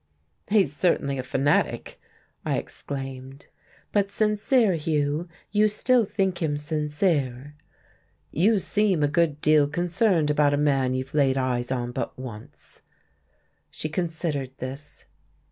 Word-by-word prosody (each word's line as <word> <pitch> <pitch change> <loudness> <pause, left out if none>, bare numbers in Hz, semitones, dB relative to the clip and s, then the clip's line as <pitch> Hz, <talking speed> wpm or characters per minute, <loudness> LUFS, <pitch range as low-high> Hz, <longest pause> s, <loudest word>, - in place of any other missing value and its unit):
"He's 195 -9 +2
certainly 140 -6 +1
a - - 0
fanatic!" 135 +3 0 0.4
I - - 0
exclaimed. 135 0 -7 0.5
"But 200 -1 +1
sincere, 210 +1 +2
Hugh 150 0 -1 0.2
you 210 +1 +4
still 230 +3 +2
think 190 -3 -1
him 150 -3 0
sincere." 150 -3 -1 0.8
"You 205 +7 +3
seem 195 -3 +1
a - - +4
good 155 -1 +1
deal 150 -1 +4
concerned 175 0 +1
about 145 -1 +3
a - - -2
man 135 -3 +2
you've 130 +1 -4
laid 135 -3 +3
eyes 125 -1 -1
on 120 -2 -2
but - - -4
once." 130 +2 -10 0.9
She 155 - -5
considered 160 -6 -3
this. 135 +3 -8
150 Hz, 125 wpm, -25 LUFS, 135-180 Hz, 0.9 s, you